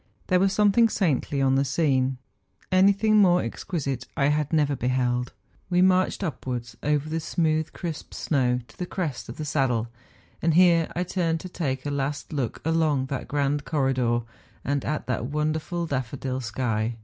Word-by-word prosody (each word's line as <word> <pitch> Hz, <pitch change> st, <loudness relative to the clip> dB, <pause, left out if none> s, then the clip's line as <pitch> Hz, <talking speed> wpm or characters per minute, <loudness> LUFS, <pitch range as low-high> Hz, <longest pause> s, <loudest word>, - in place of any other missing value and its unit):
There 185 Hz, -, +4 dB
was 195 Hz, +1 st, +3 dB
something 210 Hz, +3 st, +4 dB
saintly 145 Hz, -8 st, 0 dB
on 135 Hz, 0 st, +3 dB
the 135 Hz, +1 st, +3 dB
scene. 135 Hz, -2 st, +1 dB, 0.5 s
Anything 200 Hz, +3 st, +4 dB
more 180 Hz, -3 st, +5 dB
exquisite 140 Hz, -7 st, -4 dB
I 140 Hz, +1 st, +3 dB
had 150 Hz, -1 st, 0 dB
never 145 Hz, -3 st, +2 dB
beheld. 125 Hz, 0 st, 0 dB, 0.4 s
We 180 Hz, 0 st, +4 dB
marched 185 Hz, +1 st, +2 dB
upwards 125 Hz, -8 st, -4 dB
over 150 Hz, 0 st, 0 dB
the 160 Hz, +1 st, -2 dB
smooth 155 Hz, -1 st, 0 dB
crisp 165 Hz, -4 st, -6 dB
snow 125 Hz, -4 st, +1 dB
to -, -, -19 dB
the 180 Hz, -, -3 dB
crest 160 Hz, -10 st, -4 dB
of -, -, -8 dB
the 155 Hz, -, -4 dB
saddle, 130 Hz, -6 st, 0 dB, 0.5 s
and 160 Hz, -1 st, +2 dB
here 170 Hz, -2 st, +5 dB
I 175 Hz, -, 0 dB
turned 170 Hz, -2 st, -1 dB
to 185 Hz, -, -7 dB
take 135 Hz, -7 st, -3 dB
a 145 Hz, -, -1 dB
last 145 Hz, +3 st, -3 dB
look 135 Hz, -6 st, -2 dB
along 160 Hz, -4 st, +2 dB
that 135 Hz, -3 st, -4 dB
grand 145 Hz, 0 st, 0 dB
corridor, 130 Hz, -6 st, +1 dB, 0.4 s
and 140 Hz, -1 st, 0 dB
at 150 Hz, +1 st, -2 dB
that 130 Hz, -1 st, -2 dB
wonderful 155 Hz, +4 st, -1 dB
^ -, -, -7 dB
daffodil 130 Hz, 0 st, -3 dB
sky. 110 Hz, -1 st, -1 dB
145 Hz, 170 wpm, -25 LUFS, 130-170 Hz, 0.5 s, more